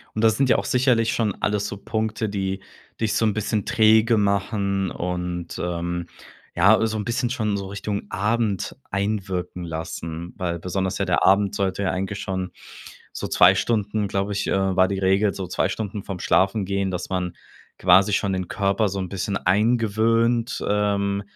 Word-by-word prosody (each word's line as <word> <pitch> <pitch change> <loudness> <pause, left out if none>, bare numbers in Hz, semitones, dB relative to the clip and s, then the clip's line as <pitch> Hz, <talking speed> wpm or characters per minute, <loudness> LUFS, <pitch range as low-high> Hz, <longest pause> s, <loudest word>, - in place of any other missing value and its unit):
Und 110 - 0
das 110 -1 +4
sind 135 +1 +2
ja - - +6
auch - - -2
sicherlich 125 -3 +2
schon 110 -4 0
alles 105 -1 0
so - - -5
Punkte, 110 +1 -2
die 95 -1 -3 0.4
dich 110 -2 0
so - - +2
'n 105 - +1
bisschen 110 0 -1
träge 110 0 +4
machen 100 -1 0
und, 90 -1 -4
ähm, 85 0 -3 0.5
ja, 100 +5 +5
äh, 110 - +2
so 110 0 -2
'n 105 - -3
bisschen 120 +2 -1
schon 110 -4 -1
so 100 -1 -4
Richtung 100 +1 -4
Abend 105 -1 -1
einwirken 95 -3 -2
lassen, 80 +1 -5
weil 85 -2 -2
besonders 95 +2 -2
ja - - +1
der - - +1
Abend 100 +1 +4
sollte 100 0 -1
ja 95 - +1
eigentlich 95 +2 -3
schon 95 -1 -3 0.6
so - - -5
2 90 +2 +6
Stunden, 105 0 0
glaube 100 +1 -1
ich 100 - -2
äh, 95 -1 +1
war 95 0 +5
die 100 - -2
Regel 95 +2 +2
so 95 - -4
2 90 +1 0
Stunden 105 0 -4
vorm 95 -3 -6
Schlafengehen, 100 0 +1
dass 90 - -4
man 90 -2 -2 0.4
quasi 95 +3 +5
schon 100 0 +1
den 95 -2 -3
Körper 100 +1 +1
so 100 +1 -4
'n 95 -1 -3
bisschen 100 +2 -3
eingewöhnt, 115 +3 +2
ähm, 100 -1 +1
100 Hz, 180 wpm, -23 LUFS, 95-110 Hz, 0.6 s, ja